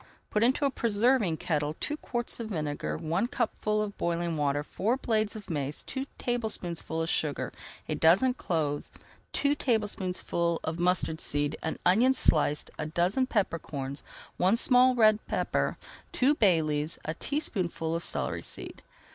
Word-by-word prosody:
Put 210 - +1
into 260 +4 +3
a 275 - +2
preserving 225 -6 +2
kettle 150 -2 -1
[Page - - -34
290] - - 0 0.2
two - - -20
quarts 240 0 -2
of 230 - -4
vinegar, 150 -6 -2
one 165 +8 0
cupful 215 -3 0
of 205 -1 -5
boiling 170 -1 -1
water, 145 -1 0
four 220 - -1
blades 220 -4 0
of 210 -2 -8
mace, 145 -3 -2
two 270 +1 -4
tablespoonfuls 180 -9 -2
of - - -3
sugar, 150 -3 -1 0.3
a - - -1
dozen 190 +11 +4
cloves, 155 - -2 0.4
two 285 0 +2
tablespoonfuls 185 - -1
of 160 +1 -3
mustard 175 -2 +1
seed, 145 +1 0
an 160 - -3
onion 245 +8 +5
sliced, 150 - +2
a - - -2
dozen 180 +11 +1
pepper 200 -8 0
corns, 140 -2 -5 0.4
one 190 +5 +3
small 255 +1 +5
red 215 -2 +5
pepper, - - 0 0.3
two 265 +3 +3
bay 185 - +4
leaves, 150 +1 0
and 155 - -2
a - - -32
teaspoonful 185 - -2
of 170 - -2
celery - - -2
seed. - - -8
180 Hz, 165 wpm, -29 LUFS, 160-235 Hz, 0.4 s, onion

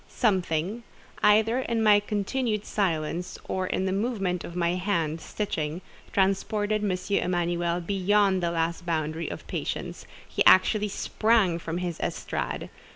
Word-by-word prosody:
Something—either 210 - +1
in 230 -3 -1
my 210 -1 +6
continued 210 +2 -1
silence 175 -2 -1
or 185 -1 -1
in 190 - -1
the 190 - 0
movement 195 -4 -1
of 170 - -8
my 170 -1 +1
hand, 170 -4 -1
stitching—transported 195 +4 -1
M. 190 -3 +1 0.3
Emanuel 175 -1 0
beyond 195 +1 +2
the 170 - +1
last 165 +1 -1
boundary 160 -1 -2
of - - -7
patience; - - -4 0.2
he - - +1
actually 210 -1 +6
sprang 205 -3 +2
from 165 0 -4
his 175 -2 -3
estrade. - - -3
190 Hz, 125 wpm, -27 LUFS, 170-210 Hz, 0.3 s, my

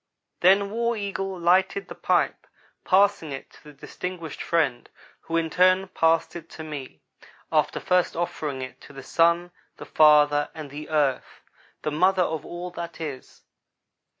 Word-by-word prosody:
Then 195 +2 +4
War 235 +1 -1
Eagle 195 -2 -4
lighted 185 - +2
the - - -8
pipe, - - 0 0.4
passing 190 -5 +3
it 135 - -8
to - - -19
the 150 - -11
distinguished 165 +3 -7
friend, 145 -8 0 0.3
who 165 - -3
in 165 -1 -1
turn 185 +2 +3
passed 165 -2 +1
it 165 -1 -9
to 160 - -6
me, 140 - -8 0.5
after - - +1
first 180 -1 +1
offering 150 -5 -3
it 130 - -10
to - - -14
the 135 -1 -10
Sun, 170 +1 +2 0.3
the - - -9
father, 150 -1 +4
and 155 -3 -8
the 150 +2 -8
Earth, 145 -4 -1 0.4
the 150 - -1
mother 185 +4 +3
of 160 -3 -3
all 175 +1 -6
that 170 -1 -7
is. 145 -5 -8
165 Hz, 155 wpm, -25 LUFS, 150-185 Hz, 0.5 s, Then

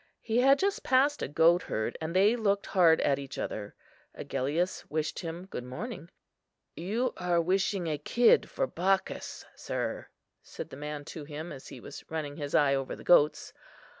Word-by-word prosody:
He 230 +1 +1
had 270 +2 +6
just 395 +4 0
passed 275 +3 +3
a - - -1
goatherd, 160 -7 +2
and 160 +2 -4
they 205 +5 +5
looked 200 -4 +1
hard 170 -4 +4
at 140 -1 +2
each 140 -1 -8
other. 105 -1 -5 0.4
Agellius 150 +8 -2
wished 155 0 -2
him 170 +1 -6
good 155 -10 -6
morning. 170 - -7 0.7
"You 215 +9 -1
are 175 -1 +1
wishing 190 +2 +1
a 155 -3 -2
kid 235 +10 +4
for - - -1
Bacchus, 190 +2 -1
sir," - - -4 0.3
said - - -9
the - - -7
man 150 +1 -6
to 155 0 -7
him 155 +3 -7
as 135 - -9
he 130 - -9
was 140 - -10
running 150 -3 -4
his 145 -2 -3
eye 140 -2 +4
over 135 -1 -2
the - - -12
goats. 150 -3 +4
165 Hz, 170 wpm, -29 LUFS, 145-195 Hz, 0.7 s, had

